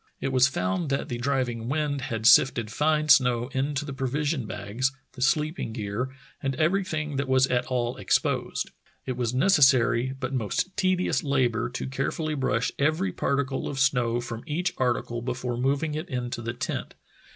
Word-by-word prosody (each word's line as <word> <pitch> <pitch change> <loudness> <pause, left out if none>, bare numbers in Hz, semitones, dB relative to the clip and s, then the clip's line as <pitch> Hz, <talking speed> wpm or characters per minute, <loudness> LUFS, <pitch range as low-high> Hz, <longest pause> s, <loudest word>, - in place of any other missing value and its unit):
It - - -2
was 130 -1 +5
found 95 - -1
that 135 +2 -1
the 120 -2 -3
driving 120 -3 -1
wind 145 -1 -1
had 115 -4 -4
sifted 115 -3 +5
fine 155 +4 +1
snow 125 -3 +5
into 140 +1 -1
the 140 - -5
pro 135 0 -2
vision 145 -2 -1
bags, 105 +7 -2 0.2
the 125 - -11
sleeping 150 -2 0
gear, 110 +3 -3 0.3
and 135 -1 -1
everything 155 -3 0
that 140 0 -1
was 130 0 +4
at 125 -2 0
all 125 -1 -1
exposed. 100 - 0 0.3
It 130 - -2
was 120 -2 -1
a - - -1
necessary 130 -6 +4
but 130 0 -3
most 130 - -1
tedious 185 -1 +1
labor 125 -5 +1
to 125 - -4
carefully 140 +4 -2
brush 130 -4 0
every 155 +7 +1
particle 140 -1 -1
of 140 - -4
snow 125 -3 +2
from 115 -1 -6
each 170 +3 -1
article 120 -2 0
before 125 0 -3
moving 140 +5 0
it 155 +4 -4
into 125 -2 -3
the 115 0 -3
tent. 120 - -4
130 Hz, 175 wpm, -26 LUFS, 120-145 Hz, 0.3 s, was